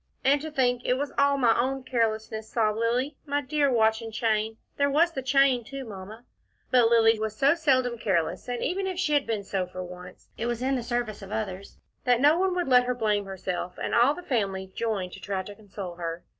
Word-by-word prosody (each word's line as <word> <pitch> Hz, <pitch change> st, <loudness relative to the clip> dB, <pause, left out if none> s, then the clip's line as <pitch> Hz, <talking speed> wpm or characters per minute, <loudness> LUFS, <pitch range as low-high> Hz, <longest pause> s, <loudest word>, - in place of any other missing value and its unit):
"And 280 Hz, +2 st, +3 dB
to 315 Hz, -, -5 dB
think 250 Hz, -4 st, +1 dB
it 250 Hz, -, +2 dB
was 285 Hz, +2 st, -3 dB
all 280 Hz, 0 st, +3 dB
my 235 Hz, -4 st, +4 dB
own 265 Hz, +2 st, -1 dB
carelessness," 220 Hz, -3 st, -1 dB
sobbed 220 Hz, -2 st, +1 dB
Lilly. 250 Hz, +5 st, 0 dB
"My 285 Hz, 0 st, +1 dB
dear 285 Hz, 0 st, +1 dB
watch 220 Hz, -1 st, +3 dB
and 225 Hz, -1 st, -7 dB
chain 220 Hz, -1 st, 0 dB, 0.2 s
there 285 Hz, 0 st, +2 dB
was 325 Hz, +5 st, +3 dB
the 270 Hz, -, -4 dB
chain 260 Hz, -1 st, +3 dB
too, 270 Hz, +3 st, -7 dB
Mamma." 215 Hz, +2 st, -10 dB, 0.5 s
But 245 Hz, -3 st, +5 dB
Lilly 225 Hz, -1 st, +4 dB
was 215 Hz, 0 st, -3 dB
so 275 Hz, +5 st, +4 dB
seldom 255 Hz, -7 st, +1 dB
careless, 180 Hz, -3 st, -1 dB
and 245 Hz, -1 st, -2 dB
even 380 Hz, +3 st, -1 dB
if 375 Hz, -2 st, -3 dB
she 300 Hz, -4 st, 0 dB
had 285 Hz, -4 st, +2 dB
been 220 Hz, -3 st, -2 dB
so 190 Hz, -2 st, -2 dB
for 185 Hz, 0 st, -6 dB
once, 180 Hz, 0 st, -11 dB
it 230 Hz, -, -1 dB
was 240 Hz, 0 st, -2 dB
in 270 Hz, +1 st, +1 dB
the 250 Hz, -, -1 dB
service 240 Hz, -3 st, -3 dB
of 195 Hz, 0 st, -10 dB
others, 200 Hz, -3 st, -5 dB, 0.3 s
that 245 Hz, -1 st, +4 dB
no 295 Hz, +4 st, +5 dB
one 375 Hz, -1 st, +1 dB
would 355 Hz, -4 st, -1 dB
let 250 Hz, -1 st, +5 dB
her 250 Hz, 0 st, -1 dB
blame 210 Hz, -3 st, 0 dB
herself, 180 Hz, -2 st, -5 dB
and -, -, -3 dB
all 245 Hz, +5 st, +4 dB
the 360 Hz, -, -9 dB
family 195 Hz, -, -2 dB
joined 210 Hz, -6 st, -2 dB
to -, -, -9 dB
try 195 Hz, -2 st, -3 dB
to 205 Hz, -, -9 dB
console 195 Hz, -4 st, -8 dB
her. 170 Hz, 0 st, -5 dB
235 Hz, 225 wpm, -27 LUFS, 210-270 Hz, 0.5 s, But